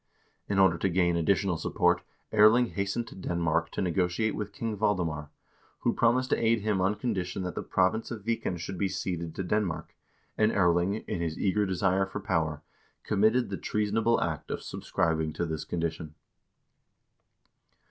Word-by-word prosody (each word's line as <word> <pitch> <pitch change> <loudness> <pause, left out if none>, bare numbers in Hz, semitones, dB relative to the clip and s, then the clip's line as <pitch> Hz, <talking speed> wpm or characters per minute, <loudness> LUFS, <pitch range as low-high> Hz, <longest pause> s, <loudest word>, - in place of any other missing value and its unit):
In 100 - 0
order 95 -4 +4
to 95 - +1
gain 85 -1 +2
additional 90 +1 +1
support 90 +1 +1 0.3
Erling 110 +3 +6
hastened 100 +4 -2
to - - -12
Denmark 85 -3 0
to - - -1
negotiate 90 +4 0
with 105 -1 -4
King 110 +1 -3
Valdemar, 85 -8 -1 0.5
who - - +2
promised 125 +2 +2
to - - +1
aid 115 -1 +3
him 105 -2 0
on 95 +3 +2
con 120 +1 -1
dition 90 -1 -3
that 90 -2 -3
the - - -3
province 95 +5 +1
of 115 -4 -6
Viken 115 -5 -1
should 90 +2 -6
be 100 - +2
ceded 85 -3 -3
to 95 - -3
Denmark, 90 -5 -2 0.4
and 110 0 +4
Erling, 90 +1 +2
in 85 - -2
his 80 -2 -2
eager 100 +1 +1
desire 95 +1 +1
for 100 - -5
power, 80 -6 -1 0.4
committed 110 +3 +2
the 95 - -2
treasonable 105 +2 +1
act 80 -4 -3
of - - -4
subscribing 80 -1 -1
to 85 - -2
this 80 -2 -4
condition. 80 -2 -3
95 Hz, 170 wpm, -29 LUFS, 85-105 Hz, 0.5 s, Erling